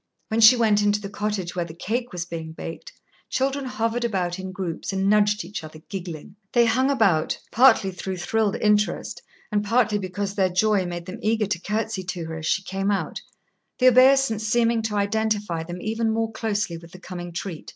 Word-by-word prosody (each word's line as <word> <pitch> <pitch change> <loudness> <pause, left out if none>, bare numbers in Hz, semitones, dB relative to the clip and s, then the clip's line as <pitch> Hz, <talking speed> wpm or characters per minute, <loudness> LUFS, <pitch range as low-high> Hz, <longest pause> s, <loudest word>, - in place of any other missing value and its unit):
When 225 0 +1
she 225 +3 +9
went 215 -3 +3
into 205 0 +2
the 200 -1 -7
cottage 205 -4 -3
where 175 - 0
the 165 -1 -9
cake 235 +7 -3
was 175 -2 -4
being 160 -2 -6
baked, 165 0 -8 0.4
children 270 +1 -1
hovered 230 -1 -1
about 185 -6 -1
in 190 0 -5
groups 185 -2 -4
and 195 0 0
nudged 210 0 +3
each 190 -4 -6
other, 155 0 -10
giggling. 180 -2 -7 0.2
They 240 -1 +5
hung 255 +4 +2
about, 200 - +2
partly 225 -5 +5
through 185 +1 -5
thrilled 210 +4 0
interest, 210 -2 +1 0.3
and 205 0 +1
partly 220 -1 +2
because 195 +1 -3
their 190 -2 +2
joy 190 0 +2
made 175 -1 -5
them 185 - -7
eager 220 0 +1
to 190 -4 -2
courtesy 210 -1 -2
to 180 -2 -4
her 160 0 -5
as 160 - -4
she 190 - +1
came 195 +1 -2
out, 200 -1 -2 0.6
the 255 0 +6
obeisance 255 -3 +5
seeming 230 0 +2
to 220 -1 -3
identify 205 -4 0
them 175 +2 -7
even 225 +3 -1
more 225 0 0
closely 210 -6 -2
with 165 0 -14
the 185 - -11
coming 175 -1 -7
treat. 170 -1 -6
205 Hz, 195 wpm, -24 LUFS, 180-225 Hz, 0.6 s, she